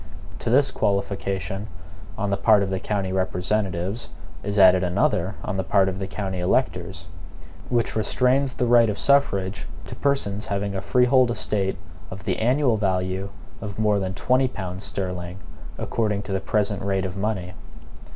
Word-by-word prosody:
To - - -2
this 135 +4 +4
qualification 100 -1 -2 0.5
on 100 0 -1
the - - +3
part 105 0 +4
of 95 - -3
the 95 - -1
county 95 -2 -2
representatives 95 +2 -1 0.3
is 105 +1 -3
added 95 -1 +7
another 90 +1 +1
on 105 - -3
the 95 - 0
part 95 0 +3
of 95 0 -3
the 95 - -3
county 95 -2 -4
electors, 90 -3 0 0.6
which 120 -2 0
restrains 125 +4 +1
the 125 - 0
right 120 -1 +5
of 105 - -2
suffrage 100 -10 +1 0.2
to - - -7
persons 110 -8 -1
having 100 -1 -2
a 95 - -2
freehold 125 +6 +4
estate 100 -4 -1 0.3
of 95 +1 -8
the - - -1
annual 125 0 +2
value 95 -1 -1 0.3
of 100 -3 -6
more 105 -1 +2
than 95 -1 -3
twenty 130 +5 +2
pounds 95 -5 -6
sterling, 90 -2 -4 0.4
according 105 -3 -1
to 100 - -7
the 95 0 0
present 105 -1 0
rate 95 -1 0
of 95 0 -4
money. 95 -3 -2
100 Hz, 160 wpm, -24 LUFS, 95-110 Hz, 0.6 s, added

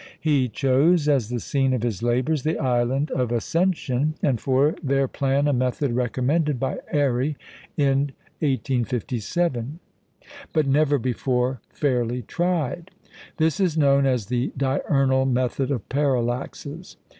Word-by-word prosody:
He 140 -5 +1
chose, 145 +7 +2
as 135 -7 +2
the 120 0 -2
scene 135 +3 0
of 125 -3 -1
his 115 -5 -2
labours, 125 +5 +1
the 155 +3 -1
Island 130 +3 0
of 125 -2 -1
Ascension, 155 - 0
and 125 -6 +1
for 135 +4 +2
their 135 -2 +1
plan 140 +2 0
a 145 - +2
method 130 +2 0
recommended 130 +4 0
by 135 - -2
Airy 140 0 +1 0.4
in 140 0 +2 0.3
1857, 130 - -1 0.8
but 155 -2 +2
never 145 +1 +3
before 125 0 -1
fairly 125 -3 -1
tried. 175 - -2 0.5
This 160 +1 +1
is 180 -5 +1
known 140 -2 +4
as 125 -5 0
the 120 +4 -1
"diurnal 135 0 +1
method 130 +1 0
of 130 -8 -3
parallaxes." 140 +4 -2
135 Hz, 130 wpm, -24 LUFS, 125-145 Hz, 0.8 s, known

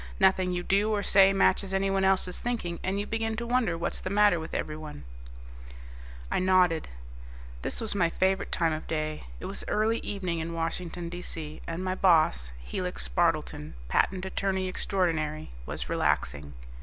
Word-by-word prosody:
Nothing 190 -2 +4
you 175 0 -2
do 200 +4 +2
or 205 -1 0
say 195 0 +6
matches 195 0 +2
anyone 195 0 +1
else's 190 -1 +2
thinking, 220 -9 -3
and 190 +2 -1
you 205 - -2
begin 225 0 -2
to 235 +2 -3
wonder 235 -8 +1
what's 170 - -3
the - - -3
matter 205 -3 +4
with 160 - -6
everyone." 155 - -5 1.3
I - - +2
nodded. 180 -3 +3 0.7
This - - -2
was 225 -2 +3
my 175 -4 +2
favorite 190 +3 0
time 165 -2 +1
of 155 - -5
day. 155 -1 -3
It - - -7
was - - -5
early 220 +2 +1
evening 185 -5 -3
in 165 +1 -4
Washington, 170 +1 -3
D.C., 165 -3 -6
and 165 +2 -3
my 185 0 0
boss, 155 - +3
Helix - - -2
Spardleton, 75 +4 0
patent 185 - +1
attorney 190 0 -1
extraordinary, 160 - -1 0.2
was - - -4
relaxing. 70 -1 0
180 Hz, 160 wpm, -28 LUFS, 160-195 Hz, 1.3 s, say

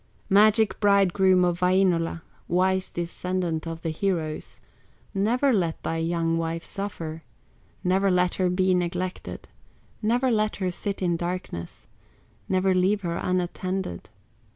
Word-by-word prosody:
"Magic 215 0 +5
bridegroom 190 -2 +4
of 175 -1 0
Wainola, 180 -3 +2 0.2
Wise 185 +1 +1
descendant 175 -1 -3
of 165 0 -6
the 165 - -1
heroes, 160 -3 -3 0.5
Never 240 +7 +2
let 170 -6 0
thy 165 - -1
young 165 0 0
wife 165 0 -3
suffer, 165 -5 -5 0.6
Never 190 +2 +2
let 180 -1 +2
her 180 - +3
be 185 +1 +2
neglected, 180 +1 -3 0.5
Never 245 +4 +2
let 215 -1 +1
her 185 -2 -1
sit 200 +2 -4
in 175 -2 +1
darkness, 175 - -5 0.6
Never 190 0 +2
leave 190 +3 +2
her 170 -2 -2
unattended. 185 - -2
185 Hz, 125 wpm, -25 LUFS, 170-195 Hz, 0.6 s, Magic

